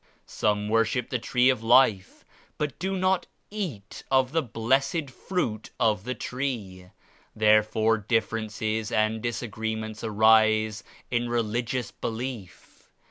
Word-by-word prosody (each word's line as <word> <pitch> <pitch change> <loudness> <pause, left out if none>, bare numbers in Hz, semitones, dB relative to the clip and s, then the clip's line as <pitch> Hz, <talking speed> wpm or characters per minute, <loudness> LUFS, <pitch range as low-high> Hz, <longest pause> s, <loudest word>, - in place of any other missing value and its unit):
Some 105 0 -1
worship 115 +2 +1
the 125 - 0
Tree 125 +2 +2
of 125 - -3
Life 115 -5 +3 0.3
but 150 -2 -3
do 190 +1 -2
not 185 0 +1 0.2
eat 155 - -6
of 130 -1 +3
the 165 +1 +2
blessed 135 +5 0
Fruit 125 - -3
of 105 -3 +1
the 125 +1 -3
Tree. 110 -9 -4 0.5
Therefore 110 +1 +3
differences 110 0 -1
and 110 +1 +1
disagreements 110 -2 -4
arise 110 0 +3 0.3
in 120 0 0
religious 120 +2 -1
belief. 115 -5 -7
115 Hz, 115 wpm, -26 LUFS, 110-125 Hz, 0.5 s, Life